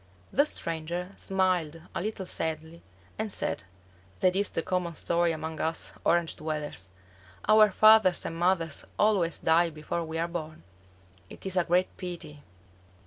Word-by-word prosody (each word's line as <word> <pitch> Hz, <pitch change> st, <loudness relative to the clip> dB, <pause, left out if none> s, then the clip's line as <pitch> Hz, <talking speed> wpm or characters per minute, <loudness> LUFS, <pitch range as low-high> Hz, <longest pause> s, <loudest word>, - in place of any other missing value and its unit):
The 285 Hz, +3 st, +4 dB
stranger 170 Hz, -, -3 dB
smiled 180 Hz, -4 st, 0 dB
a -, -, -2 dB
little 205 Hz, -1 st, -4 dB
sadly 160 Hz, 0 st, -4 dB, 0.4 s
and 220 Hz, -1 st, -2 dB
said, -, -, -1 dB, 0.6 s
"That 180 Hz, 0 st, +3 dB
is 200 Hz, +1 st, +2 dB
the 165 Hz, -, -2 dB
common 180 Hz, -2 st, -2 dB
story 170 Hz, +2 st, +1 dB
among 160 Hz, 0 st, -5 dB
us 160 Hz, +1 st, -3 dB
Orange 170 Hz, -1 st, +2 dB
dwellers. 150 Hz, -, -5 dB, 0.6 s
Our 215 Hz, 0 st, +7 dB
fathers 215 Hz, -2 st, +5 dB
and 165 Hz, -, -4 dB
mothers 170 Hz, -3 st, +1 dB
always 195 Hz, -6 st, +2 dB
die 165 Hz, +1 st, +3 dB
before 155 Hz, +2 st, -4 dB
we 160 Hz, 0 st, -5 dB
are 165 Hz, +1 st, 0 dB
born. 160 Hz, -, -6 dB, 0.7 s
It -, -, -12 dB
is 190 Hz, -1 st, -2 dB
a 180 Hz, -2 st, +2 dB
great 180 Hz, +2 st, +1 dB
pity. 170 Hz, -5 st, -7 dB
170 Hz, 145 wpm, -28 LUFS, 160-185 Hz, 0.7 s, Our